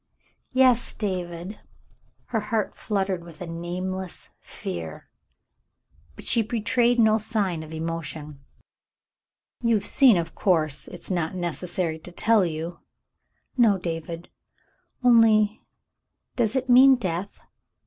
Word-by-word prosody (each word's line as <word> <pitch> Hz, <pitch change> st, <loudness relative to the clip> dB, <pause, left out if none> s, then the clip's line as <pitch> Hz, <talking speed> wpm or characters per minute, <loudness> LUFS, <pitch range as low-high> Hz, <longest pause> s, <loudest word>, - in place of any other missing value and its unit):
"Yes, 255 Hz, -2 st, +3 dB
David." 180 Hz, -1 st, -4 dB, 0.7 s
Her 225 Hz, -, 0 dB
heart 210 Hz, 0 st, -2 dB
fluttered 195 Hz, -4 st, -2 dB
with 170 Hz, -2 st, -13 dB
a 180 Hz, -, -5 dB
nameless 180 Hz, +2 st, -5 dB
fear, 80 Hz, -3 st, -7 dB, 1.0 s
but -, -, -12 dB
she 230 Hz, -, +3 dB
betrayed 235 Hz, +2 st, +1 dB
no 220 Hz, -1 st, +5 dB
sign 200 Hz, -6 st, 0 dB
of 155 Hz, 0 st, -10 dB
emotion. 160 Hz, -2 st, -5 dB, 1.2 s
"You've 225 Hz, -4 st, +1 dB
seen, 255 Hz, -8 st, +5 dB
of 165 Hz, -1 st, -3 dB
course. 160 Hz, -7 st, +1 dB
It's 180 Hz, -, -7 dB
not 175 Hz, -1 st, -1 dB
necessary 175 Hz, -1 st, -3 dB
to 175 Hz, +3 st, -10 dB
tell 220 Hz, +3 st, +3 dB
you." 165 Hz, 0 st, -4 dB, 0.8 s
"No, 225 Hz, -6 st, +4 dB
David 165 Hz, -1 st, -5 dB, 0.4 s
— -, -, -41 dB
only 220 Hz, -3 st, +5 dB, 0.4 s
— -, -, -55 dB
does 230 Hz, -2 st, 0 dB
it 260 Hz, -1 st, 0 dB
mean 260 Hz, +2 st, +7 dB
death 190 Hz, -4 st, -4 dB
185 Hz, 120 wpm, -25 LUFS, 170-225 Hz, 1.2 s, mean